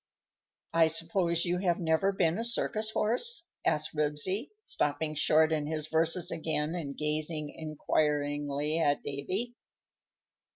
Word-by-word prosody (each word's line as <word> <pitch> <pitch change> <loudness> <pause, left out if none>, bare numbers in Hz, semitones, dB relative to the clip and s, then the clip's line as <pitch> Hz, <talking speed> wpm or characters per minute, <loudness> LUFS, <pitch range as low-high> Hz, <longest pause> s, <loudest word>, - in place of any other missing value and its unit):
_ - - -63 0.8
"I 165 - +7
suppose 170 +2 +1
you 175 +1 0
have 175 -3 +1
never 165 +3 +2
been 175 -1 +1
a - - -1
circus 220 -2 0
horse?" 250 - 0 0.2
said 150 - +3
Ribsy, 150 - -1 0.2
stopping 150 +1 -1
short 155 +1 +3
in 150 -2 0
his 155 -1 -3
verses 165 +2 +1
again 160 -1 -1
and 150 -6 -5
gazing 150 0 -1
inquiringly 150 -1 -1
at 145 -3 +1
Davy. 185 - -3
160 Hz, 130 wpm, -30 LUFS, 150-180 Hz, 0.8 s, I